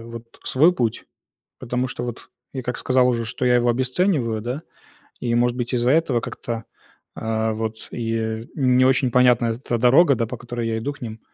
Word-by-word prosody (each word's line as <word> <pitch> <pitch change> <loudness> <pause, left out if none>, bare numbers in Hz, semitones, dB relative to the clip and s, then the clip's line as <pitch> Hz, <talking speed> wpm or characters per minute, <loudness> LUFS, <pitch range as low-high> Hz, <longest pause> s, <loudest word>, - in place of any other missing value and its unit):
вот 115 0 -9 0.2
свой 155 +7 +4
путь, 115 -6 -1 0.6
потому 125 +2 -2
что 120 - -5
вот 120 -1 -7 0.2
я, 130 -2 -4
как 125 +1 -3
сказал 130 -1 +3
уже, 115 -1 -1
что 120 +3 -3
я 125 0 +4
его 120 0 +3
обесцениваю, 125 - 0
да, 125 +7 -4 0.6
и, 120 -1 -1
может 120 0 +2
быть, 120 +1 -3
из-за 120 +1 +2
этого 145 -6 +2
как-то, 115 -1 -5 0.5
а, 110 0 -1
вот 110 0 -5
и 115 -1 -3
не 130 -3 +3
очень 130 -1 +3
понятна 125 -1 +4
эта 120 +1 -2
дорога, 135 +6 +5
да, 115 -1 -1
по 125 +2 -6
которой 120 -1 -4
я 110 0 -1
иду 140 +6 -3
к - - -19
ним. 115 -2 -6
120 Hz, 190 wpm, -22 LUFS, 115-130 Hz, 0.6 s, дорога